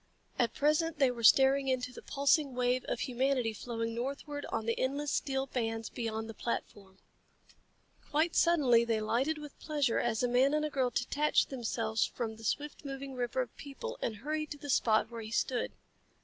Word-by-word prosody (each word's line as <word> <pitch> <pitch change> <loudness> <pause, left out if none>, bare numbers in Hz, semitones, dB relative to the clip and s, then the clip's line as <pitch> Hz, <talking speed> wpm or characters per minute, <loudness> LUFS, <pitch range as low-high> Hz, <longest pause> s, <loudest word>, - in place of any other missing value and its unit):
At 235 - +1
present 305 +2 +2
they 270 -3 +4
were 235 -1 -7
staring 270 +3 +6
into 250 -1 -1
the - - -9
pulsing 280 -1 +2
wave 250 0 +1
of 235 - -3
humanity 255 -2 0
flowing 230 +1 -4
northward 280 +4 -4
on 225 -1 -3
the 230 - -1
endless 280 +3 -1
steel 270 -1 0
bands 225 -4 -3
beyond 225 -1 -3
the 225 - -7
platform. 200 -4 -5 1.1
Quite 315 +3 +1
suddenly 270 -9 +5
they 230 -2 0
lighted 255 +8 0
with 295 -1 -10
pleasure 290 -6 0
as 235 -1 0
a - - +3
man 260 +4 +3
and 305 0 +1
a 305 - -3
girl 260 -3 +1
detached 285 +7 +1
themselves 225 -3 -1
from 225 -3 -3
the 225 - -13
swift 290 +8 -2
moving 275 -1 -6
river 250 0 -1
of 240 - -13
people 470 - -7
and 220 - -1
hurried 305 +7 -3
to 290 - -6
the 285 -1 -4
spot 220 -1 +3
where 230 -1 -6
he 215 - -7
stood. 245 +2 0
255 Hz, 185 wpm, -32 LUFS, 230-285 Hz, 1.1 s, staring